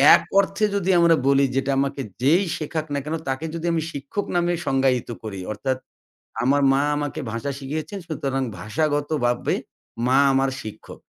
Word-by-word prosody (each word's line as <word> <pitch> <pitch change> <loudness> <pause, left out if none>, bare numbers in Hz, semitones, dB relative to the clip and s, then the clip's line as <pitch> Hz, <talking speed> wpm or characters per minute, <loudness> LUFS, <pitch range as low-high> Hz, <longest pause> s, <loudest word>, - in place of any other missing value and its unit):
এক - - +1 0.2
অর্থে 200 +2 +1
যদি 195 -2 0
আমরা 170 -1 +6
বলি, 140 0 +5
যেটা 135 +1 +1
আমাকে 140 0 -1 0.2
যেই 170 +9 +4
শেখাক 155 0 -3
না 140 - 0
কেন? 155 +2 -2
তাকে 135 +5 -2
যদি 165 +1 -4
আমি 160 - +1
শিক্ষক 140 +9 -4
নামে 175 0 +2
সংজ্ঞায়িত 130 -3 +1
করি 100 -3 -5
অর্থাৎ, 130 +5 -1 0.7
আমার 140 +3 +3
মা 135 - +3 0.2
আমাকে 145 -1 -3
ভাষা 115 +5 -3
শিখিয়েছেন 155 +7 -4
সুতরাং 135 -4 -2 0.2
ভাষাগতভাবে, 145 - 0 0.5
মা 130 +2 +4 0.2
আমার 135 0 +3
শিক্ষক। 110 -4 -9
140 Hz, 155 wpm, -23 LUFS, 135-160 Hz, 0.7 s, আমরা